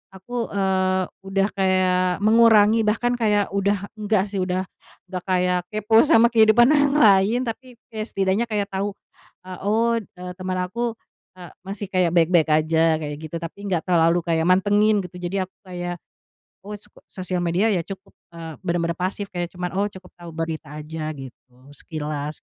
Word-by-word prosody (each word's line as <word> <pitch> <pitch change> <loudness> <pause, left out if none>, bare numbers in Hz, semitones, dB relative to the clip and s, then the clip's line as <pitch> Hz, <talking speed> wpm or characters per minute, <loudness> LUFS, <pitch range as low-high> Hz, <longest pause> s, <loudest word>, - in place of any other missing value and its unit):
aku, 235 +5 -4
eee, 190 -1 +1 0.2
udah 195 0 +1
kayak 185 -1 +1
mengurangi 225 0 +5
bahkan 240 +3 +1
kayak 210 -4 +1
udah 200 0 0
enggak 210 -2 +1
sih, 195 - -2
udah 185 0 -1 0.5
gak 180 -1 -4
kayak 180 -1 +1
kepo 215 +1 +3
sama 235 -5 +5
kehidupan 225 +2 +5
orang 285 -1 +3
lain, 205 -1 +5
tapi 250 +2 -7 0.2
ya 215 - -4
setidaknya 195 +4 0
kayak 205 -2 -2
tahu, 195 +1 -3 0.5
eee, 185 -1 -8
"Oh, 230 +3 +2
eee, 180 -3 -10
teman 185 0 -3
aku, 235 +4 -3 0.4
eee, 175 -2 -11
masih 200 +1 -5
kayak 180 -3 +2
baik-baik 165 -1 +3
aja," 160 +1 +3
kayak 150 -2 -5
gitu. 170 - -7
Tapi 165 +4 -8
gak 175 -3 -1
terlalu 170 -1 +3
kayak 165 -1 0
mantengin 205 +2 +3
gitu, 180 0 -10
jadi 185 +2 -2
aku 185 - -47
kayak, 175 -1 -5 0.7
oh, 210 - -6
soko 205 - -18
sosial 185 -1 -4
media 180 +6 +1
ya 180 - +1
cukup, 195 0 -10 0.2
eee, 165 -2 -7
bener-bener 170 0 -2
pasif 195 +2 -3
kayak 175 -1 -3
cuma, 180 -1 -4
"Oh," 200 +3 0
cukup 190 -2 -15
tahu 175 - -10
berita 160 -2 -5
aja, 155 0 -6
gitu 130 -1 -12 0.2
sekilas. 150 0 -6
185 Hz, 165 wpm, -22 LUFS, 175-210 Hz, 0.7 s, mengurangi